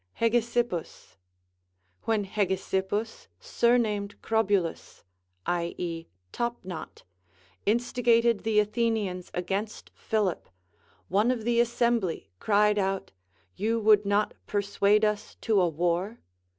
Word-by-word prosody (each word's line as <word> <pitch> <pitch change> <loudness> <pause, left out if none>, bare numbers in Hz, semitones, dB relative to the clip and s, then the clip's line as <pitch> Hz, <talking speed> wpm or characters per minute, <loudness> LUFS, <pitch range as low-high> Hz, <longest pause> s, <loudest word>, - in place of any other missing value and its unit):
Hegesippus. 235 -5 -1 0.9
AVhen 215 -3 +1
Hegesippus, 195 +2 -2
surnamed 215 -4 +1
Crobylus 205 -6 0 0.4
(i.e. 170 -1 -3 0.2
Top 240 0 -2
knot), 180 -3 -8 0.6
instigated 235 0 +2
the 220 -1 +3
Athenians 210 -4 -1
against 195 +4 -3
Philip, 210 -5 -1 0.6
one 205 +6 +2
of 245 -3 -1
the 235 +1 +2
assembly 235 - 0
cried 210 0 +3
out, 195 0 -1 0.4
You 225 +3 0
would 210 -1 +5
not 205 +1 +1
persuade 205 +1 +2
us 210 0 -2
to 215 -4 +3
a 180 - +3
war 175 +7 -1
210 Hz, 100 wpm, -27 LUFS, 190-230 Hz, 0.9 s, would